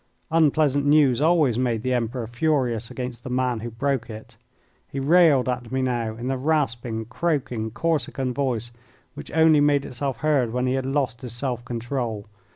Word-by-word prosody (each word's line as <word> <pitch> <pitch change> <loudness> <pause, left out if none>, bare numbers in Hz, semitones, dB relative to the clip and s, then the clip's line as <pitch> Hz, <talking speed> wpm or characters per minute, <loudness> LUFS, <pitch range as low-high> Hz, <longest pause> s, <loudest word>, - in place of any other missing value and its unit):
Unpleasant 150 -3 +3
news 145 -3 +4
always 155 -7 +3
made 120 -3 0
the 130 0 0
Emperor 120 0 -2
furious 120 -2 0
against 125 -2 -6
the - - -6
man 125 -2 0
who 120 +2 -5
broke 130 +1 -2
it. 110 +1 -10 0.5
He 135 - -4
railed 150 -2 +4
at 125 -1 -3
me 130 0 0
now 120 -3 -1
in 120 +2 -6
the 135 0 -1
rasping, 125 -6 -1
croaking, 125 -4 -2
Corsican 135 -2 -1
voice 120 -4 -2 0.4
which - - -9
only 160 -1 +5
made 145 -1 +3
itself 135 +1 -4
heard 135 -7 +2
when 125 0 0
he 130 - +1
had 130 0 -1
lost 135 -4 -1
his 125 -3 -7
self 120 -1 -3
control. 120 -3 -4
130 Hz, 170 wpm, -24 LUFS, 120-145 Hz, 0.5 s, only